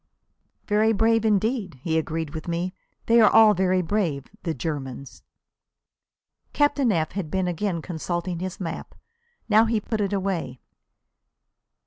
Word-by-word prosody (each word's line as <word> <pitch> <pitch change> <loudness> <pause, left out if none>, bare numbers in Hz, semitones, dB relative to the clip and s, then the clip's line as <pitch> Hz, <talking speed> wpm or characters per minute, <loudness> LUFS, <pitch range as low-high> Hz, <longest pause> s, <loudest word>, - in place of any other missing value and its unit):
"Very 215 +1 +3
brave 225 +1 +2
indeed," 210 - 0
he 160 -2 -1
agreed 160 -1 -2
with 160 +1 -7
me. 175 +2 -2 0.3
"They 230 0 +5
are - - +7
all 220 -1 +7
very 185 0 +1
brave, 165 -8 -1 0.2
the 165 -2 -3
Germans." 135 -3 -5 1.3
Captain 290 -4 +2
F 160 -5 0
had 185 -5 -4
been 190 +2 -1
again 175 -1 -2
consulting 175 0 -3
his 185 0 -5
map. 170 -3 -6 0.5
Now 220 +1 +5
he 225 -1 +1
put 215 +1 -3
it 200 -1 -1
away. 185 -10 -2
185 Hz, 135 wpm, -24 LUFS, 160-215 Hz, 1.3 s, are